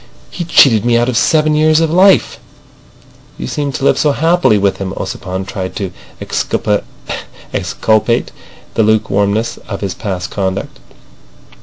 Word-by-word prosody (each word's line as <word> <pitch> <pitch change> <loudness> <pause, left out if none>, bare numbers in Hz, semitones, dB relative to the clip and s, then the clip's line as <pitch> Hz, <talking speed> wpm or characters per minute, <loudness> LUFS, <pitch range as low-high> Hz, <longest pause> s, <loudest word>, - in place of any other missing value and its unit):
He 175 - -5
cheated 120 -9 +5
me 120 0 +3
out 120 +1 +1
of 125 - -2
seven 155 +4 +3
years 155 +1 +4
of 165 -1 +1
life." 190 +2 +4 1.0
"You - - -5
seemed 140 - -3
to 135 - -2
live - - +3
so 150 -2 +2
happily 165 -7 +3
with 100 -1 +1
him." 95 -1 -4
Ossipon 95 0 -4
tried 95 -1 -5
to 95 -4 -4 0.3
exculpate - - -1 1.9
the - - +1
lukewarmness 110 0 +1
of 100 -2 -5
his 100 -3 -2
past 90 -3 -5
conduct. 95 -1 -3
110 Hz, 140 wpm, -15 LUFS, 95-150 Hz, 1.9 s, cheated